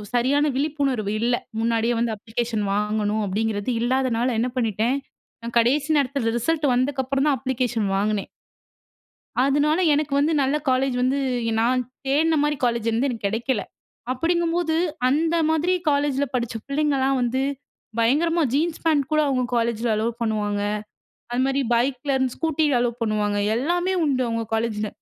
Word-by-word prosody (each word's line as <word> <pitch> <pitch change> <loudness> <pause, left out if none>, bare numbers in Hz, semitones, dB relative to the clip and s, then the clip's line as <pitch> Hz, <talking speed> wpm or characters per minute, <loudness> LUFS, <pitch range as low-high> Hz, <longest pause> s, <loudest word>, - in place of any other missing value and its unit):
சரியான 275 +5 +2
விழிப்புணர்வு 275 -7 -1
இல்ல. 240 +1 +2 0.2
முன்னாடியே 230 +1 +1
வந்து 230 -1 0
அப்ளிகேஷன் 220 0 -3
வாங்கணும், 210 +1 0
அப்படிங்கிறது 210 +2 -1
இல்லாதனால 250 -1 +1
என்ன 250 +2 0
பண்ணிட்டேன், 230 +2 +1 0.5
நான் 235 +1 -6
கடைசி 275 +6 +2
நேரத்தில 265 -4 0
ரிசல்ட் 300 +5 0
வந்ததுக்கப்புறம் 265 +2 0
தான் 280 - +2
அப்ளிகேஷன் 245 -4 -1
வாங்குனேன். 205 0 -1 1.2
அதனால 290 +4 +2 0.2
எனக்கு 295 0 -1
வந்து 295 +3 +2
நல்ல 275 +3 +1
காலேஜ் 260 0 +1
வந்து 260 +2 +1 0.4
நான் 250 +2 +2 0.3
தேடின 315 +4 +2
மாரி 295 0 +1
காலேஜ் 235 -2 0
வந்து 240 +5 +1
எனக்கு 230 -5 -3
கிடைக்கல. 230 +2 -1 0.5
அப்படிங்கும்போது, 335 +3 0 0.3
அந்த 320 +5 +1
மாதிரி 320 +3 +1 0.2
காலேஜில 285 -1 +1
படிச்ச 235 -2 -1
பிள்ளைங்கலாம் 275 -2 +1
வந்து 250 +2 0 0.6
பயங்கரமா 325 +9 +2
ஜீன்ஸ் 315 +4 0
பேண்ட் 300 -4 +3
கூட 305 - +4
அவுங்க 255 -2 +1
காலேஜில 235 0 0
அலோவ் 230 +2 -2
பண்ணுவாங்க. 210 -2 -1 0.7
அதுமாதிரி 265 +3 +1
பைக்கிலருந்து, 260 +1 0
ஸ்கூட்டி 320 -1 +1
அலோவ் 240 0 -1
பண்ணுவாங்க. 210 -2 0 0.2
எல்லாமே 350 +8 0
உண்டு. 265 -3 +1
அவுங்க 230 0 -2
காலேஜில. 220 -2 -1
255 Hz, 135 wpm, -23 LUFS, 230-285 Hz, 1.2 s, கூட